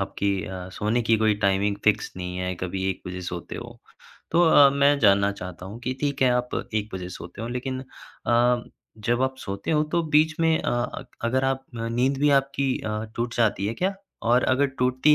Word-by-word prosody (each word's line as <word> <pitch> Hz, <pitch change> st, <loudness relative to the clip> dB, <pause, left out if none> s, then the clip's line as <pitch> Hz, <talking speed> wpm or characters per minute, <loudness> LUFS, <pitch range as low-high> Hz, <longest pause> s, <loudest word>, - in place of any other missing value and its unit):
आपकी 100 Hz, 0 st, -1 dB
अ, 95 Hz, -1 st, -6 dB
सोने 110 Hz, +5 st, 0 dB
की 115 Hz, 0 st, +3 dB
कोई 110 Hz, -1 st, +3 dB
टाइमिंग 100 Hz, +1 st, +2 dB
फ़िक्स 110 Hz, -, +2 dB
नहीं 90 Hz, 0 st, -5 dB
है, 90 Hz, 0 st, -2 dB
कभी 95 Hz, +2 st, -4 dB
1 95 Hz, -, -6 dB
बजे 90 Hz, 0 st, -5 dB
सोते 90 Hz, -1 st, -6 dB
हो। -, -, -9 dB, 0.5 s
तो 170 Hz, -, +3 dB
अ, 145 Hz, -3 st, +7 dB
मैं 140 Hz, +1 st, +3 dB
जानना 100 Hz, -4 st, +4 dB
चाहता 90 Hz, -2 st, -8 dB
हूँ 105 Hz, +5 st, -8 dB
कि 130 Hz, +2 st, -2 dB
ठीक 140 Hz, -2 st, 0 dB
है, 130 Hz, -, +5 dB
आप 125 Hz, 0 st, 0 dB, 0.2 s
1 105 Hz, -1 st, 0 dB
बजे 90 Hz, -1 st, -5 dB
सोते 90 Hz, +3 st, -8 dB
हो, 115 Hz, -, -4 dB
लेकिन 130 Hz, +1 st, -3 dB, 0.5 s
अ, 120 Hz, 0 st, +3 dB, 0.4 s
जब 120 Hz, +4 st, 0 dB
आप 130 Hz, 0 st, 0 dB
सोते 100 Hz, +1 st, -5 dB
हो 150 Hz, -1 st, +3 dB
तो 170 Hz, -1 st, +2 dB
बीच 155 Hz, +1 st, +4 dB
में 160 Hz, -1 st, +4 dB
अ, -, -, -1 dB
अग 120 Hz, 0 st, -2 dB, 0.2 s
अगर 130 Hz, +3 st, +1 dB
आप 135 Hz, 0 st, 0 dB
नींद 120 Hz, +4 st, 0 dB
भी 145 Hz, +1 st, +3 dB
आपकी 135 Hz, -1 st, -2 dB
अ, 110 Hz, 0 st, -3 dB
टूट 120 Hz, 0 st, -2 dB
जाती 105 Hz, -4 st, +2 dB
है 110 Hz, -, -2 dB
क्या? 190 Hz, +9 st, -1 dB, 0.3 s
और 120 Hz, +2 st, +3 dB
अगर 130 Hz, +2 st, +3 dB
टूटती 130 Hz, +4 st, +4 dB
120 Hz, 205 wpm, -25 LUFS, 100-135 Hz, 0.5 s, अ